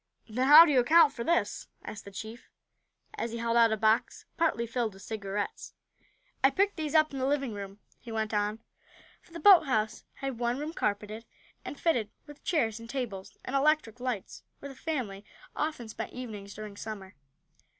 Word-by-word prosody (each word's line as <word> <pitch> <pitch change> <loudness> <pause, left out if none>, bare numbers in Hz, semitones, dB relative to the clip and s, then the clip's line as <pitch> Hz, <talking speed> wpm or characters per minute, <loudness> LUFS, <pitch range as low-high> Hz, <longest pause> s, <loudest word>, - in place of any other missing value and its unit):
"Then 250 +4 0
how 305 +4 +11
do 315 - +1
you 265 - +5
account 310 +4 +6
for 235 - -5
this?" 340 +6 0 0.2
asked 210 - -8
the 200 - -9
chief, 220 +4 -9 0.7
as 230 0 -3
he - - -3
held 230 0 -1
out 230 -1 +6
a 220 - +1
box 220 +1 +1
partly 315 -9 +1
filled 230 -2 -2
with 195 - -13
cigarettes. 205 -2 -4 0.7
"I 270 - +7
picked 395 +7 +1
these 310 -2 -3
up 310 -2 +4
in 270 - -4
the 260 - 0
living 275 -4 0
room," 200 -1 -7 0.2
he 235 - -10
went 220 -1 -2
on, 210 +2 -1 0.6
for - - -24
the 335 - -7
boathouse 275 - +5
had 270 -4 -5
one 240 +1 0
room 300 +3 -4
carpeted, 210 -2 -2 0.4
and 290 - -7
fitted 245 -11 +1 0.2
with 295 -1 -14
chairs 235 - 0
and 230 0 -11
tables, 235 -8 -5
and 265 - -3
electric 275 -5 +2
lights 245 -6 -4 0.2
where 280 - -9
the 270 - -10
family 250 -11 -4 0.3
often 305 -7 -2
spent 220 - -6
evenings 210 -5 -7
during 210 -1 -8
Summer. 205 -3 -7
235 Hz, 185 wpm, -29 LUFS, 215-285 Hz, 0.7 s, how